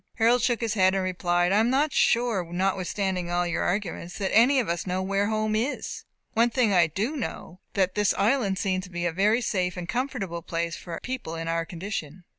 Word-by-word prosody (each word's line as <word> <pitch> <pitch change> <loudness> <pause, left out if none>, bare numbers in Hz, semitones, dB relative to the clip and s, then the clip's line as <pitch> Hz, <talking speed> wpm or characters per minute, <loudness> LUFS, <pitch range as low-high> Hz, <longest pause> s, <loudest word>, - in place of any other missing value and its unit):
Harold 235 +1 +3
shook 240 -3 +1
his 225 -2 0
head, 190 -2 +3
and 190 - 0
replied, 175 -1 +1
"I 205 - +4
am 225 +2 +3
not 280 +3 +2
sure, 235 -5 +2
notwithstanding 185 0 -1
all 175 0 +1
your 175 -1 -1
arguments, 175 -2 -2
that 195 -2 -1
any 255 +5 +6
of 240 - -1
us 170 +2 -2
know 185 +1 -1
where 195 +1 0
home 215 0 0
is. 240 +7 -3 0.3
One 230 +2 +4
thing 235 -4 +2
I 175 -3 +5
do 210 - -2
know, 205 - -6 0.2
that 185 -2 +2
this 210 -1 +2
island 205 -2 +1
seems 185 -2 -1
to - - -13
be 175 -1 -3
a 175 - +1
very 210 +7 +2
safe 180 -5 -1
and 175 -1 -5
comfortable 235 -8 -3
place 170 0 -3
for 170 -2 -7
people 250 -10 -4
in 165 0 -5
our 165 0 0
condition. 175 -2 -6
195 Hz, 215 wpm, -26 LUFS, 175-225 Hz, 0.3 s, any